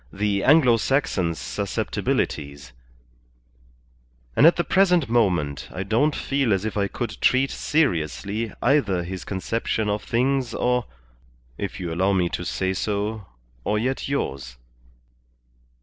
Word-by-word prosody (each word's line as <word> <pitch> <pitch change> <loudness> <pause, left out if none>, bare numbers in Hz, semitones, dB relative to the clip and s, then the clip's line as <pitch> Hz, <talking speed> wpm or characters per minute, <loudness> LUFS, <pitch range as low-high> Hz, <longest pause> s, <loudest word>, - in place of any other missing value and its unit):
the 100 0 -1
Anglo 135 -5 +5
Saxon's 95 - 0
susceptibilities, 70 -1 -3 1.6
and 150 - +7
at 170 - +6
the 175 - 0
present 180 -7 +3
moment 90 - +1
I 95 - -4
don't 120 +10 +1
feel 135 -5 0
as 95 +2 -1
if 110 - -3
I 100 -1 +1
could 105 0 -5
treat 130 +1 +3
seriously 105 - -1
either 110 -10 +2
his 90 +1 -6
conception 105 +2 -2
of 105 0 -2
things 130 0 0
or 125 0 0 0.7
if - - -4
you 85 -3 -4
allow 95 +4 +2
me 90 -2 +1
to 90 - -4
say 95 +1 -1
so 105 +1 -2 0.4
or 105 - 0
yet 130 +5 -2
yours." 65 - -3
105 Hz, 130 wpm, -24 LUFS, 95-130 Hz, 1.6 s, and